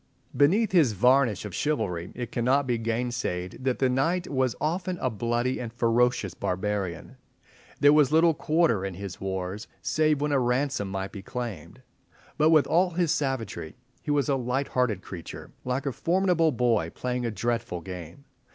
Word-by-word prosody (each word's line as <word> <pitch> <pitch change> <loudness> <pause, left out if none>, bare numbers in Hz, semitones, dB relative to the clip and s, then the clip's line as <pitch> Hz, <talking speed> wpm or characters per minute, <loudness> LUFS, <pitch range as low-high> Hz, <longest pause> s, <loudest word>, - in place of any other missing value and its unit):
Beneath 190 +10 +3
his 155 - +4
varnish 125 -1 +3
of 105 - -7
chivalry, 90 - -2
it 120 -1 -5
cannot 130 +4 +2
be 120 -2 0
gainsayed 115 -6 -2
that 130 -2 0
the 130 - +2
knight 165 +8 0
was 130 -3 0
often 180 +3 -1
a 130 - -1
bloody 120 +4 -1
and 120 -2 -5
ferocious 120 -4 +1
barbarian. 95 -2 -3 0.6
There 145 +1 +7
was 150 -2 +4
little 165 +1 +5
quarter 155 - +1
in 95 -2 -4
his 95 0 -7
wars, 95 +2 -4 0.2
save 155 -2 +2
when 150 +1 0
a 140 - +3
ransom 125 -3 0
might 95 0 -4
be 100 - -8
claimed. 115 - -6 0.6
But 155 +1 +5
with 155 -3 +5
all 180 +2 +3
his 170 -2 0
savagery, 115 - -2 0.3
he - - -8
was 145 -1 +2
a 140 - +2
light 130 +2 -1
hearted 115 -7 0
creature, 85 -4 -9
like 125 +3 -2
a 140 - 0
formidable 170 - +2
boy 115 - +1
playing 125 0 -2
a 120 - 0
dreadful 115 -4 -2
game. 90 - -9
125 Hz, 170 wpm, -27 LUFS, 105-145 Hz, 0.6 s, There